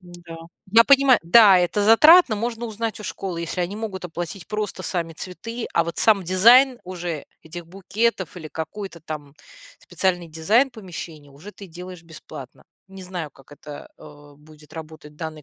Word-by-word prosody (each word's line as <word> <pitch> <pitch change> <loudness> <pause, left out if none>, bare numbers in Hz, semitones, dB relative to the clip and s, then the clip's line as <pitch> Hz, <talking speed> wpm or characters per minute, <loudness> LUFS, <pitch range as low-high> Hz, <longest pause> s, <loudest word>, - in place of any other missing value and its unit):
Н-да, 175 -2 -12 0.4
я 230 +1 +7
понимаю. 275 -2 +5
Да, 195 +2 +7
это 180 +4 0
затратно. 300 +4 +7
Можно 235 +2 -4
узнать 225 0 -4
у - - -9
школы, 185 -5 -5
если 170 +2 -4
они 180 +3 -3
могут 210 -4 -6
оплатить 175 +1 -6
просто 210 -3 -4
сами 170 -3 -3
цветы, 225 +8 -7
а 170 - +2
вот 170 - -6
сам 210 -3 +3
дизайн 240 +8 +5
уже 175 -4 -6 0.2
этих 165 +1 -9
букетов 195 -1 -2
или 160 -3 -8
какой-то 170 +3 -7
там 150 -3 -8 0.4
специальный 175 -1 -2
дизайн 210 - +2
помещения 165 - -10
уже 155 +10 -13
ты 200 - -12
делаешь 180 0 -11
бесплатно. 155 -5 -12 0.2
Не 195 0 -11
знаю, 180 -4 -6
как 135 +1 -20
это, 145 0 -11
э, 145 -1 -15
будет 150 0 -19
работать 155 -2 -11
в - - -24
данной 155 -1 -7
180 Hz, 165 wpm, -22 LUFS, 160-210 Hz, 0.4 s, я